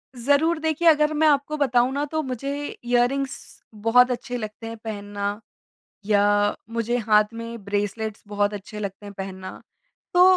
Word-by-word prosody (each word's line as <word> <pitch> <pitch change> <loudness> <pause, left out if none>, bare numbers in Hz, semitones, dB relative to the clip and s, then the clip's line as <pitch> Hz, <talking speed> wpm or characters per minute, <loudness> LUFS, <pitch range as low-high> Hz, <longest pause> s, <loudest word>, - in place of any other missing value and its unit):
ज़रूर 285 +7 +2
देखिए, 320 +1 +1
अगर 305 -1 +5
मैं 310 +1 +3
आपको 290 +1 +2
बताऊँ 255 -3 +3
ना 285 +1 0
तो 315 0 0
मुझे 275 +2 -3 0.2
इयररिंग्स 245 +3 -1
बहुत 235 +4 +4
अच्छे 245 0 -3
लगते 215 0 -6
हैं 230 0 -6
पहनना 205 -1 -4 0.7
या 205 0 +3 0.2
मुझे 230 +1 0
हाथ 210 -1 +3
में 230 -1 -7
ब्रेसलेट्स 205 +1 -2
बहुत 205 0 0
अच्छे 210 +1 -7
लगते 200 0 -6
हैं 200 - -8
पहनना। 190 -1 -7 0.5
तो 355 0 +7
230 Hz, 150 wpm, -24 LUFS, 205-275 Hz, 0.7 s, तो